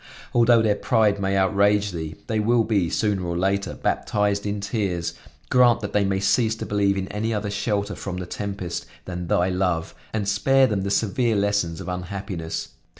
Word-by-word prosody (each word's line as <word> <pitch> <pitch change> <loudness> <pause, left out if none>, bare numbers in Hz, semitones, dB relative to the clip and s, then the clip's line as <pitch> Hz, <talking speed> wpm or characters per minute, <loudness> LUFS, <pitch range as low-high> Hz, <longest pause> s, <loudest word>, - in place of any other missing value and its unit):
Although 120 -1 +5
their 105 -2 +3
pride 110 -4 +2
may 95 0 +1
outrage 100 +1 +3
Thee, 80 -2 -5
they 110 -1 -1
will 115 +2 +3
be, 100 -6 +1
sooner 100 -1 0
or 85 -1 -2
later, 100 +2 0
baptized 105 -1 0
in 100 0 -2
tears; 100 -5 -2 0.4
grant 120 -2 +5
that 100 - -5
they 105 -1 +3
may 95 0 0
cease 110 +3 +2
to - - -6
believe 100 -1 +1
in 95 0 -2
any 110 +2 -2
other 105 -1 -2
shelter 100 0 -1
from 95 -3 -5
the 90 - -4
tempest, 95 -2 -5 0.2
than 90 -1 -5
Thy 90 +2 +2
love, 90 -3 -1 0.2
and 105 -2 -2
spare 135 +7 +4
them 105 -6 0
the 100 - -2
severe 115 +3 +1
lessons 100 -5 0
of 90 - -7
unhappiness. 90 -2 -4
100 Hz, 185 wpm, -24 LUFS, 95-105 Hz, 0.4 s, Although